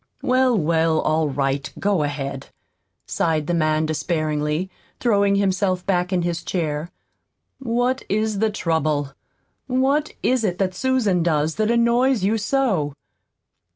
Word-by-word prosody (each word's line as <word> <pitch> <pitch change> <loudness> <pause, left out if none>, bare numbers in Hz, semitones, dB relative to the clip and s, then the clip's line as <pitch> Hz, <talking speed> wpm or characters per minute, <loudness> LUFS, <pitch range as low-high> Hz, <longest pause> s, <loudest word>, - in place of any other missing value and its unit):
"Well, 255 -2 +3
well, 160 -1 +2
all 155 -1 +1
right, 135 0 -1
go 200 -4 +1
ahead," 140 -2 -4 0.6
sighed 160 -2 0
the 175 - -1
man 155 -1 +1
despairingly, 155 +1 -1 0.3
throwing 200 -4 +2
himself 190 -2 0
back 180 -1 0
in 180 -2 +1
his 170 0 -2
chair. 160 -2 -2 0.7
"What 250 +1 0
is 215 0 0
the 220 +1 +2
trouble? 155 -7 -1 0.5
What 275 +4 +1
is 255 -2 +2
it 180 -4 0
that 190 -1 0
Susan 220 -5 +1
does 160 -2 +1
that 215 0 +1
annoys 235 0 +2
you 215 +3 +1
so?" 205 - 0
180 Hz, 130 wpm, -22 LUFS, 155-220 Hz, 0.7 s, Well